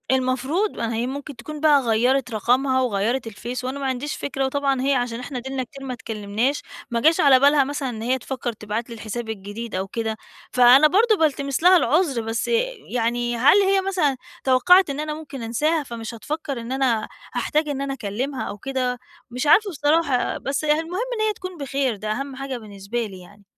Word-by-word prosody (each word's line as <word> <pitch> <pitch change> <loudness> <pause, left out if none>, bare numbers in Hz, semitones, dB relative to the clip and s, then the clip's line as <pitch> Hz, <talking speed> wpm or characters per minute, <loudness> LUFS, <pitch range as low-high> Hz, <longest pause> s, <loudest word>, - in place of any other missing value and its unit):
المفروض 265 - +1
ما 230 0 -2
هي 235 +2 -1
ممكن 280 +2 -6
تكون 300 +6 -8
بقى 295 -2 +5
غيّرت 245 +2 +1
رقمها 260 +5 +2
وغيّرت 235 +1 0
الفيس، 235 +4 -6
وأنا 265 +2 -3
ما 275 - -3
عَنديش 265 +3 -2
فكرة 270 -1 -2
وطبعًا 275 -1 0
هي 275 +1 +2
عشان 245 -2 -1
إحنا 250 +1 -6
أديلنا 265 +1 -3
كتير 270 +2 -11
ما 255 - -3
اتكلّمناش، 225 +3 -2 0.3
ما 235 - +1
جاش 320 +4 +4
على 270 -3 +6
بالها 285 +1 +5
مثلًا 280 -1 -3
إن 220 -3 -6
هي 250 +3 +1
تفكّر 255 -1 -4
تبعت 215 +2 -4
لي 235 - -7
الحساب 225 +1 -5
الجديد 215 +2 -6
أو 190 +1 -2
كده، 220 +1 -3 0.3
فأنا 250 +4 +7
برضو 430 +6 +3
بالتمس 280 -2 0
لها 365 +1 +8
العذر، 295 -3 +2
بس 225 0 -2 0.5
يعني 240 0 0
هل 270 - +6
هي 390 0 +3
مثلًا 360 -8 0 0.3
توقّعِت 295 +8 +5
إن 280 +1 -3
أنا 305 0 -2
ممكن 300 -4 -8
أنساها 295 +8 0
فمش 235 -3 -7
هتفكّر 280 +2 -4
إن 230 +2 -7
أنا 260 -5 +1 0.3
هاحتاج 305 +1 0
إن 275 -1 -2
أنا 275 0 -2
أكلّمها 260 +4 -3
أو 205 - -5
كده؟ 255 +1 -2 0.3
مش 250 +4 -2
عارفة 420 +6 +6
بصراحة، 290 -4 +1
بس 280 +3 -2
هي 300 - +3
المهم 345 +5 -3 0.2
إن - - 0
هي 430 - +1
تكون 370 -2 -8
بخير، 275 -4 -1
ده 215 +1 -4
أهم 275 +4 -4
حاجة 270 -1 -4
بالنسبة 215 +1 -5
لي 195 -3 -9
يعني. 205 +3 -17
260 Hz, 195 wpm, -23 LUFS, 235-290 Hz, 0.5 s, لها